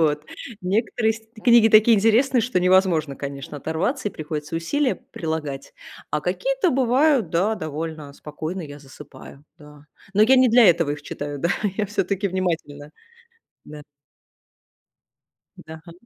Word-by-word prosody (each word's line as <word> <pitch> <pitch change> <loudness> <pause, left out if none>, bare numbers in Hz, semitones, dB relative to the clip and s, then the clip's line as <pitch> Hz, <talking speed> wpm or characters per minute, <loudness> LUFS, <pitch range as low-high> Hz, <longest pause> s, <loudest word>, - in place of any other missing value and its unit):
Вот, 150 -1 +1 0.4
некоторые 220 +4 0
с 225 - -10
т 220 0 -19
книги 235 -2 +6
такие 220 +1 +6
интересные, 235 +5 +3
что 235 -3 0
невозможно, 180 -6 +2
конечно, 140 +1 -7
оторваться, 185 - -2
и - - -12
приходится 155 0 -5
усилия 260 - 0
прилагать. 160 - -6 0.4
А - - -1
какие-то - - -1
бывают, 260 - +2
да, 195 +6 +1
довольно 155 -3 -6
спокойно 155 +5 -7
я 145 -2 -10
засыпаю, 140 0 -14
да. 150 -1 -16 0.3
Но 210 - +5
я 260 +4 +5
не 255 0 +5
для 240 +1 +6
этого 165 -3 +2
их 150 0 -5
читаю, 145 0 -6
да, 170 - -1 0.3
я 210 -2 -1
всё-таки 200 0 -2
внимательна, 165 -6 -4 0.7
да. 150 0 -11 1.7
Да, 160 0 -11
га 170 - -11
175 Hz, 140 wpm, -22 LUFS, 150-225 Hz, 1.7 s, книги